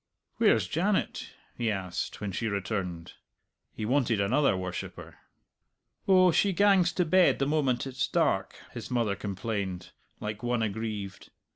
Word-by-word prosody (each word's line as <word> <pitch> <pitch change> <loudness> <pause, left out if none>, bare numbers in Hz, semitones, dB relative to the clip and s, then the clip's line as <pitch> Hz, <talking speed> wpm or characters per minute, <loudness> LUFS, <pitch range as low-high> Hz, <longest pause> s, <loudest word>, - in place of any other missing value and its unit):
"Where's - - +3
Janet?" - - -1 0.3
he 120 -2 -1
asked 95 -4 -4
when 105 -1 -3
she 110 +5 -2
returned. 95 -4 -3 0.6
He 110 - -5
wanted 120 -3 +1
another 115 +2 +2
worshipper. 90 -1 -6 0.9
"Oh, 185 -2 +6
she 195 +4 +2
gangs 195 -3 +4
to 180 - +1
bed 185 +3 +4
the 135 - 0
moment 135 -5 +1
it's 130 -1 -2
dark," - - +1 0.2
his - - -7
mother 115 -5 0
complained, 100 -2 -4 0.3
like 105 0 -5
one 120 -1 0
aggrieved. 105 -2 -4
110 Hz, 135 wpm, -28 LUFS, 100-140 Hz, 0.9 s, Oh